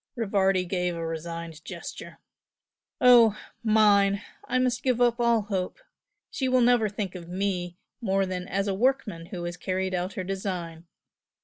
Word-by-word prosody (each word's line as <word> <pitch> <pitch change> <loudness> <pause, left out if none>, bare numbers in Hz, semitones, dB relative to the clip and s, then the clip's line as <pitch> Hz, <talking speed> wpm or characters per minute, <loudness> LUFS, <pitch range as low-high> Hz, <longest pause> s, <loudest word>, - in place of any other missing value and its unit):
Rivardi 195 -5 +1
gave 180 -1 -1
a 165 0 -4
resigned 165 0 -6
gesture. - - -8 0.8
"Oh, 235 -4 +7 0.3
MINE! 205 -2 +4 0.2
I - - 0
must 250 -1 +1
give 255 -2 +1
up 240 -1 +3
all 235 -2 +3
hope 190 -3 -3 0.5
she 260 -2 -1
will 255 0 +4
never 240 -3 +4
think 200 -2 -4
of 175 -2 -9
me 180 -2 -2 0.2
more 195 -3 +1
than 185 -1 -4
as 195 +2 -1
a 195 - 0
workman 215 -6 0
who 175 -1 -6
has 175 0 -4
carried 185 +1 -2
out 180 +1 -2
her 185 - -4
design. 180 -3 -5
195 Hz, 155 wpm, -27 LUFS, 180-225 Hz, 0.8 s, Oh